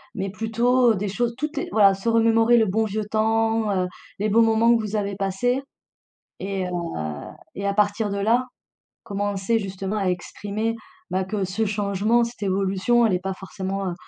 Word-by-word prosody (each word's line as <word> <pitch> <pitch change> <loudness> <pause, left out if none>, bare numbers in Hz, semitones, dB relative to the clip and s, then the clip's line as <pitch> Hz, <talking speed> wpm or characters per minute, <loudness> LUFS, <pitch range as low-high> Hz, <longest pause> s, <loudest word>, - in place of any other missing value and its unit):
mais 195 -2 -2
plutôt 235 +3 +2
des 205 0 -2
choses 235 +4 -1
tout 300 +2 -2
est - - -3
voilà, 200 -3 +6
se 195 +4 -7
remémorer 230 +1 +4
le 225 - +4
bon 220 +4 +1
vieux 215 0 -3
temps, 225 0 +1
heu, 180 - -2 0.3
les 210 +1 0
bons 230 +3 +5
moments 225 +1 +4
que 230 - +1
vous 215 0 -4
avez 200 -1 -1
passés 225 +7 0 0.8
et 195 -1 -3
heu - - -5 0.8
et 200 - -4
à 200 - +1
partir 205 +1 +1
de 200 - -3
là, 230 +5 +2 0.6
commencer 205 +1 -1
justement 195 +1 -4
à 195 - -1
exprimer, 205 +5 -3 0.4
bah, 185 +1 0
que 200 +1 -2
ce 190 +4 -1
changement, 210 +3 +1
cette 230 -3 -9
évolution, 195 +5 +2
elle 200 - +1
est 180 - +1
pas 195 - -1
forcément, 195 0 -5
heu 175 - -3
210 Hz, 185 wpm, -23 LUFS, 195-225 Hz, 0.8 s, voilà